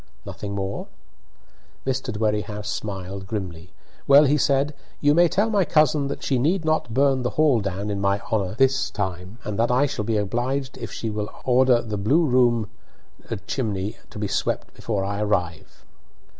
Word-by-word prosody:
"Nothing 100 -1 -6
more?" 95 0 -3 1.0
Mr. 130 -1 -1
Dwerrihouse 105 -1 -2
smiled 95 -2 -5
grimly. 95 -4 -5 0.4
"Well," 140 +2 +8
he 145 0 +3
said, 140 0 +2 0.3
"you 145 0 +4
may 175 +2 +5
tell 200 +6 +1
my 205 -3 +3
cousin 150 -3 +3
that 140 - -5
she 130 -3 +1
need 165 +6 +1
not 155 -7 0
burn 135 +2 +3
the 125 - 0
hall 150 -6 +4
down 100 +1 -3
in 100 -1 -2
my 100 0 +2
honour 105 -3 0
this 135 +2 +2
time, 95 0 -4
and 105 0 -4
that 115 - +3
I 125 +4 +3
shall 140 -7 -3
be 110 +1 0
obliged 125 +6 -1
if - - -6
she 110 - -4
will 105 0 -3 0.2
order 125 -1 +4
the 105 -2 -4
blue 140 - +3
room 120 -5 +3 0.8
chimney 105 -5 -2
to - - -11
be 105 -1 -2
swept 100 - -2
before 100 -4 -2
I 100 +1 -2
arrive." 90 -6 -2
115 Hz, 170 wpm, -24 LUFS, 100-135 Hz, 1.0 s, Well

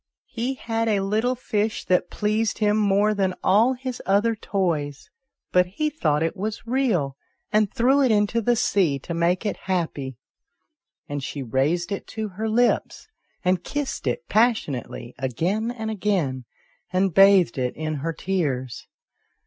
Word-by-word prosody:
" - - -79 0.2
He 260 +3 0
had 230 -2 -2
a 205 -3 +2
little 220 +6 0
fish 215 -3 -2
that 180 -1 +2
pleased 215 +1 0
him 210 -1 +2
more 210 0 +3
than 190 -3 0
all 220 +7 +4
his 255 -1 -6
other 205 +4 +3
toys, 160 -9 -2 0.4
but 180 0 +4
he 300 +12 -2
thought 155 - +1
it 165 - -1
was 210 +3 -4
real, 220 - 0 0.3
and 210 -2 +2
threw 265 +4 +3
it 260 - +4
into 215 +1 +2
the 240 +2 +2
sea 185 -10 +2
to 155 +5 -6
make 170 +4 +1
it 205 - -1
happy," 145 -8 -2 0.9
and 145 -1 -4
she 140 0 -4
raised 145 - 0
it 200 - -4
to 220 -1 -4
her 215 +4 -3
lips, 240 - +1 0.4
and 180 -1 +2
kissed 290 +4 -3
it 480 - -2
passionately 185 - 0
again 170 - -1
and 220 -2 -4
again, 180 - -1 0.5
and 185 -1 +1
bathed 195 -8 +5
it 125 -1 -1
in 155 0 -3
her 165 +4 -2
tears. 145 -9 -2
195 Hz, 155 wpm, -24 LUFS, 165-220 Hz, 0.9 s, bathed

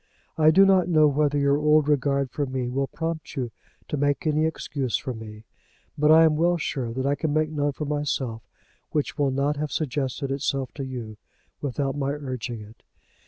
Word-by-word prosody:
I 155 -1 +5
do 190 +5 +7
not 190 -3 +4
know 155 -3 +5
whether 145 0 +1
your 140 0 +3
old 150 0 +4
regard 140 -2 +1
for 145 -2 -2
me 130 -1 -2
will 135 +2 -1
prompt 165 -3 -5
you 125 -3 -3 0.4
to 150 - -2
make 145 +2 0
any 155 +1 +2
excuse 140 -5 -2
for 130 - -5
me, 110 -1 -10 0.5
but 150 +1 +2
I 160 +1 +8
am 160 -1 +4
well 175 +2 +3
sure 130 -6 -3
that 130 +3 -3
I 140 - +2
can 155 +1 -2
make 155 +1 +1
none 145 -1 0
for 150 - -4
myself 140 -6 -2 0.5
which 150 0 -2
will 140 -1 +3
not 140 +2 0
have 150 -1 -3
suggested 140 -2 -2
itself 135 -1 -2
to 140 - -5
you, 120 -5 -6 0.4
without 140 0 -2
my 140 -1 -1
urging 130 -5 -5
it. 105 +2 -14
145 Hz, 195 wpm, -25 LUFS, 130-150 Hz, 0.5 s, I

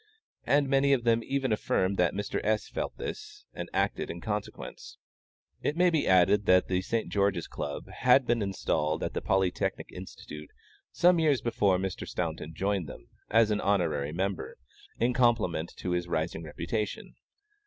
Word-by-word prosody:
And 140 +3 +3
many 140 +1 +3
of 125 -3 +1
them 115 -1 +3
even 135 -1 -1
affirm 100 -2 +1
that 90 0 +2
Mr. 100 +1 -2
S. 110 0 0
felt - - -4
this - - -7
and - - -6
acted - - -1
in 85 - -5
consequence. 105 +2 -6 0.6
It 150 - -1
may 180 0 +4
be 160 -3 +1
added 95 +3 +4
that 90 0 +5
the 90 -1 +1
St. 115 +4 -2
George's 100 -4 +1
Chess - - -10
Club 70 - -5
had 125 +1 +3
been 120 -1 +1
installed 80 -6 -1
at - - -3
the - - -2
Polytechnic 95 -2 0
Institution 75 0 -9 0.4
some 175 0 +4
years 150 -5 +3
before 100 -5 +2
Mr. 95 0 -4
Staunton 80 +2 -4
joined 95 -4 -1
them, - - -11 0.2
as 115 -1 +4
an 105 - 0
honorary 80 -8 +1
member, 95 +1 -3 0.4
in 120 +2 +1
compliment 115 -10 +2
to 90 - -3
his 90 0 -1
rising 80 0 -2
reputation. 85 +8 -4
100 Hz, 165 wpm, -29 LUFS, 90-120 Hz, 0.6 s, that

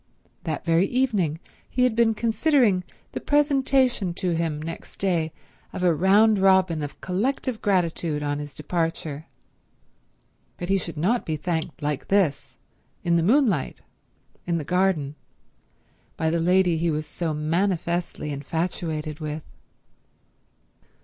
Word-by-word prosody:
That 155 -2 -3
very 170 +3 +3
evening 205 - 0 0.3
he 250 - +1
had 250 -3 +2
been 225 -1 +3
considering 230 -3 +2 0.3
the - - -4
presentation 270 - +2
to 185 -2 -1
him 165 -2 -1
next 165 +2 -7
day 170 -5 0 0.4
of 180 - -4
a 175 -2 +4
round 200 +5 +4
robin 190 -4 +4
of 145 -1 -6
collective 225 +5 -1
gratitude 170 -5 0
on 145 0 -1
his 145 -1 -7
departure; 160 -1 -3 1.3
but 175 - -5
he 195 - +4
should 170 -3 -5
not 215 +10 +1
be 160 - -2
thanked 160 -1 -3
like 145 -1 -2
this, 195 -8 +1 0.5
in 170 -1 +2
the 170 - +3
moonlight, 210 - +2 0.7
in 170 -1 +1
the 160 - -3
garden, 180 -4 +1 1.0
by 160 0 +1
the 170 - +1
lady 180 -1 +3
he 170 +1 +1
was 155 0 -1
so 160 +2 -3
manifestly 170 0 -1
infatuated 155 +1 -3
with. 155 -1 -4
170 Hz, 130 wpm, -25 LUFS, 155-200 Hz, 1.3 s, a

